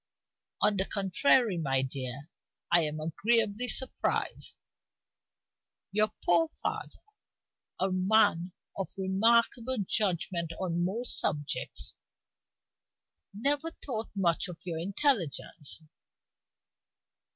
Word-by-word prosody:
"On 205 - +4
the 190 - +1
contrary, 200 +1 +2
my 135 -4 +1
dear, 130 +1 -5 0.4
I 170 0 +6
am 150 +1 -5
agreeably 215 +8 +1
surprised. 260 +1 -1 1.3
Your 215 +1 +2
poor 170 -2 +4
father - - -4 0.8
a 190 +1 +1
man 185 -2 +3 0.2
of 195 - -3
remarkable 230 +6 +2
judgment 175 -5 0
on 175 -2 0
most 225 +7 -1
subjects 145 -1 -2 1.3
never 285 +9 +1
thought 235 -8 -5
much 175 -2 +2
of 175 -2 -8
your 170 -3 -3
intelligence. 175 - 0
190 Hz, 90 wpm, -30 LUFS, 165-220 Hz, 1.3 s, I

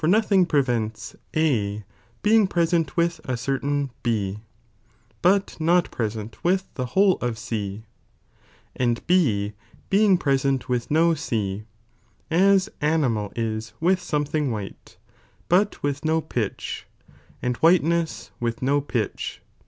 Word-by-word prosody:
thing 190 -4 +3
prevents 120 -8 -1 0.2
A 110 -10 +1 0.4
being 215 -1 +5
present 170 -4 0
with 170 -1 +1
acertain 135 +2 -1
B, 105 -4 -1 0.8
but 195 +2 +2
not 175 +2 +3
present 110 -1 -4
with 185 +2 +2
the 130 -1 -3
whole 195 -1 +5
of 120 -2 -2
G, 110 -3 -4 0.9
and 120 -2 +1
6 110 - +2 0.4
being 200 -1 +5
present 135 -4 +1
with 125 -2 -1
no 165 +2 +4
C, 105 -8 -2 0.7
as 190 +3 +4
animal 130 -10 +1
is 110 -1 -3
with 180 +3 +2
something 150 -2 -1
white, 105 -4 -7 0.5
but 200 +4 +2
with 145 +1 -1
no 160 +1 +2
pitch, 120 -10 -4 0.6
and 125 0 0
whiteness 165 -7 +2
with 120 +1 -2
no 140 +2 +2
pitch. 125 -6 -3
140 Hz, 115 wpm, -24 LUFS, 115-170 Hz, 0.9 s, being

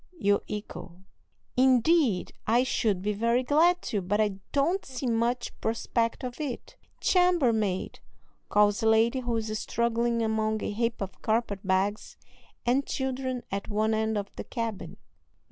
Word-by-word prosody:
you 200 -7 +2
echo. 190 -3 -7 0.5
"Indeed, 255 - +3
I 235 +3 +4
should 210 -7 0
be 210 +1 0
very 235 +4 +1
glad 335 +7 +3
to, 205 - -2
but 200 +4 -1
I 205 -3 +1
don't 330 +8 +1
see 260 0 -6
much 235 +1 0
prospect 230 +2 -1
of 250 +3 -5
it." 275 -5 -5 0.2
"Chambermaid!" 245 - +2 0.5
calls 205 +2 +3
a 225 - +3
lady 225 +3 +3
who 240 -2 -2
is 215 -1 -3
struggling 235 0 0
among 220 -1 0
a - - -2
heap 230 +2 -1
of 195 -1 -6
carpet 220 -3 0
bags 195 +2 -1 0.5
and 255 +3 +2
children 260 -1 -2
at 195 0 -3
one 215 +1 +1
end 220 0 0
of 200 -1 -5
the - - -4
cabin. 230 -5 -5
230 Hz, 145 wpm, -28 LUFS, 210-250 Hz, 0.5 s, I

